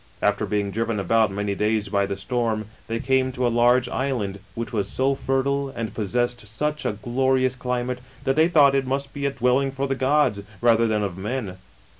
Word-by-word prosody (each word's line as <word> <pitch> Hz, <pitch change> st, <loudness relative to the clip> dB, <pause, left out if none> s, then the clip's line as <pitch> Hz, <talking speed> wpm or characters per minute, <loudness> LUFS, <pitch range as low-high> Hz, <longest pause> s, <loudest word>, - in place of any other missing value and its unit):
After -, -, +1 dB
being 100 Hz, -1 st, -1 dB
driven 115 Hz, 0 st, -1 dB
about 110 Hz, +3 st, +3 dB
many 100 Hz, +1 st, -2 dB
days 105 Hz, +1 st, 0 dB
by 100 Hz, -1 st, +1 dB
the 100 Hz, -, -3 dB
stoi 115 Hz, +3 st, -1 dB
rn, 110 Hz, 0 st, -4 dB, 0.2 s
they 115 Hz, 0 st, -2 dB
came 130 Hz, +1 st, +1 dB
to 125 Hz, -1 st, -1 dB
a -, -, +3 dB
large 120 Hz, +1 st, +4 dB
island, 120 Hz, -7 st, -2 dB, 0.2 s
which 115 Hz, +1 st, -5 dB
was 100 Hz, -3 st, 0 dB
so 135 Hz, +4 st, +1 dB
fertile 135 Hz, +1 st, 0 dB
and 115 Hz, -5 st, -5 dB
possessed 120 Hz, +2 st, -1 dB
such 150 Hz, +7 st, -2 dB
a -, -, 0 dB
glorious 130 Hz, +4 st, +1 dB
climate, 125 Hz, 0 st, -2 dB, 0.2 s
that 135 Hz, -1 st, +1 dB
they 160 Hz, +2 st, +5 dB
thought 145 Hz, -5 st, +5 dB
it 135 Hz, -1 st, +1 dB
must 135 Hz, +1 st, -2 dB
be 140 Hz, -1 st, -1 dB
a -, -, +2 dB
dwelling 130 Hz, +1 st, +2 dB
for 135 Hz, +1 st, -2 dB
the 135 Hz, -, 0 dB
gods, 130 Hz, -5 st, +2 dB, 0.2 s
rather 115 Hz, -1 st, +4 dB
than 105 Hz, -1 st, 0 dB
of 95 Hz, -2 st, -4 dB
men. 105 Hz, -3 st, -4 dB
120 Hz, 205 wpm, -24 LUFS, 105-135 Hz, 0.2 s, they